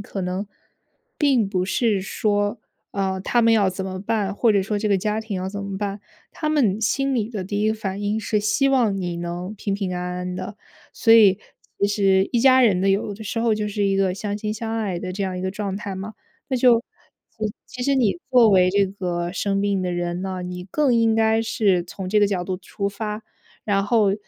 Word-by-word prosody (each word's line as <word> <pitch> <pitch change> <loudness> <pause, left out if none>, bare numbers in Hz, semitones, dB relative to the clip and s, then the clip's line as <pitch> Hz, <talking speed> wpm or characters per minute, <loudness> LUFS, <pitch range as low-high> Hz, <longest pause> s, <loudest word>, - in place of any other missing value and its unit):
可 200 -1 -6
能 185 +3 -3 0.7
并 260 -9 +3
不 185 -2 0
是 205 +1 +1
说， 205 +2 -1 0.3
呃， 190 -1 -1
他 240 +4 +1
们 230 - +5
要 210 -3 +4
怎 190 +1 -4
么 185 -1 -5
办， 205 -1 -1
或 225 +1 +3
者 200 -1 +2
说 205 +2 -2
这 215 - -1
个 200 - +3
家 210 +3 -1
庭 220 -3 -5
要 185 +1 -3
怎 200 +1 -5
么 200 -1 -5
办。 200 0 -3 0.3
他 305 - -3
们 230 -10 +2
心 275 +6 +1
里 225 -3 0
的 210 -5 -4
第 205 +2 -3
一 215 - +2
个 220 - +1
反 200 -2 -4
应 205 +1 0
是 210 0 0
希 215 +7 +2
望 240 -7 +2
你 175 -2 -3
能 175 +3 -5
平 200 -1 -3
平 195 -2 -3
安 180 - -3 0.2
安 180 0 -4
的。 205 +2 -6 0.4
所 225 - +3
以， 205 -4 +7 0.4
其 200 - +4
实 195 -2 +2
一 240 - +2
家 260 +1 +6
人 200 -7 +3
呢， 195 - +2
有 200 +1 +1
的 215 +2 -10
时 230 +2 -2
候 230 -1 +2
就 210 0 -2
是 205 0 -2
一 195 0 +2
个 190 -2 +1
相 205 +1 -3
亲 210 0 -3
相 225 +1 -4
爱 195 -6 -2
的 185 +1 -5
这 200 +2 -3
样 185 -1 -3
一 - - -4
个 185 - -1
状 195 -1 -4
态 205 -2 -5
嘛。 195 +3 -7 0.3
那 260 - 0
就， 240 -2 +5 0.6
其 215 - -2 0.2
其 250 - -7
实 275 +2 +2
你 245 -1 +2
作 245 -3 +6
为 185 -2 +5
这 200 0 +3
个 180 -3 -3
生 195 +1 -1
病 200 -2 0
的 180 - -1
人 175 0 -2
呢， 190 -1 -4
你 180 0 -6
更 290 -5 +2
应 230 -1 +3
该 220 0 +3
是 200 -5 +1
从 185 +2 -7
这 210 +2 +3
个 205 - +5
角 190 -3 -2
度 185 0 -3
出 200 +2 -4
发， 210 +1 -5 0.4
然 200 -2 +1
后 210 -2 +3
205 Hz, 250 characters per minute, -22 LUFS, 190-220 Hz, 0.7 s, 以